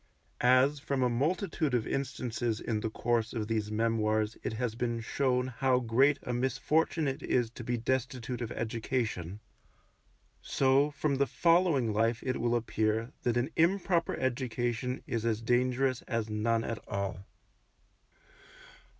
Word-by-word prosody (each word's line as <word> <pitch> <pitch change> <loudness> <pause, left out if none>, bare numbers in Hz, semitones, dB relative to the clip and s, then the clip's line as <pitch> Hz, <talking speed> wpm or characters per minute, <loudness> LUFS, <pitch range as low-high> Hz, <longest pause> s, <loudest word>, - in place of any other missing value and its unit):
As 130 +4 +4
from 140 -1 -1
a 125 - +2
multitude 155 - 0
of 115 - 0
instances 120 -4 -2
in 110 -2 -2
the 110 - -2
course 115 0 0
of 110 -3 -2
these 110 -1 -1
memoirs 110 -1 +1
it - - -3
has 115 0 -2
been 120 0 -2
shown 125 +2 0
how 130 +1 +2
great 130 +4 +3
a 125 - -3
misfortune 135 +5 +1
it 135 +2 -3
is 120 -4 0
to 120 - -9
be 120 +1 -1
destitute 125 0 -2
of 115 - -4
education, 110 -5 -3 1.0
so 135 +2 +3
from 145 -1 -1
the 140 0 +2
following 165 - +3
life 115 +2 +1
it 130 - -2
will 120 0 +2
appear 110 0 0
that 120 -1 0
an 125 +6 0
improper 175 0 +2
education 125 -1 -2
is 115 -2 -2
as 115 -2 0
dangerous 125 +2 +1
as 115 -3 -2
none 115 +2 +1
at 115 -1 -3
all. 100 -1 -4
120 Hz, 145 wpm, -30 LUFS, 115-135 Hz, 1.0 s, As